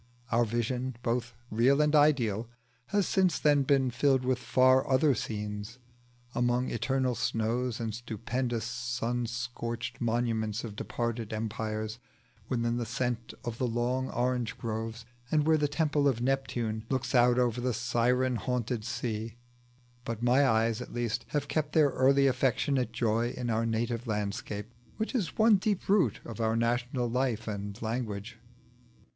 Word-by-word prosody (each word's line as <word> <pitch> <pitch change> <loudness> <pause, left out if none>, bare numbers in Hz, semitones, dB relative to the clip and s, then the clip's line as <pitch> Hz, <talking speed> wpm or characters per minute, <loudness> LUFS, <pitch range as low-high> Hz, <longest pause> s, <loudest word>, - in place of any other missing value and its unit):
Our 120 +1 +3
vision, 120 +3 -2
both 120 0 -1 0.2
real 125 +6 +4
and 150 0 +3
ideal, 120 -7 +3 0.4
has 205 -2 +1
since 185 -5 +2
then 145 -2 +4
been 135 -2 +2
filled 130 +1 +2
with 130 -1 +1
far 130 +1 +4
other 135 +2 +4
scenes: 105 0 -4 0.6
among 120 +1 +1
eternal 130 +2 0
snows 115 +2 -1
and 115 -2 -3
stupendous 120 +1 -3
sun 120 0 -2
scorched 120 -1 -4
monuments 115 -2 0
of 110 -3 -6
departed 115 0 -3
empires; 110 0 -3 0.5
within 120 -2 0
the 120 - -2
scent 120 -1 -2
of 120 -1 -4
the 125 - +1
long 125 +3 -1
orange 125 -1 -1
groves; 115 0 -4 0.2
and 150 0 +2
where 160 0 +5
the 150 -1 +2
temple 145 -1 +1
of 130 -4 +1
Neptune 120 -4 -1
looks 130 0 -1
out 125 -1 +5
over 125 -1 +1
the 125 +1 +1
siren 120 +2 +1
haunted 125 -2 -2
sea. 115 -1 -3 0.7
But 115 -1 -4
my 130 +3 +4
eyes 110 -1 +2
at - - -8
least 120 -1 -1
have 145 -1 -2
kept 155 -1 -1
their 155 -3 +5
early 135 +1 +4
affectionate 130 -1 +1
joy 115 0 0
in 120 -2 -2
our 115 +1 +1
native 115 +1 -1
landscape, 105 +1 -3 0.2
which 220 +4 -2
is 205 - -2
one 220 -1 +6
deep 200 0 -1
root 195 -2 +3
of 115 0 -6
our 110 0 +1
national 120 +2 0
life 120 -2 -1
and 100 0 -4
language. 110 -2 -4
120 Hz, 150 wpm, -30 LUFS, 115-130 Hz, 0.7 s, one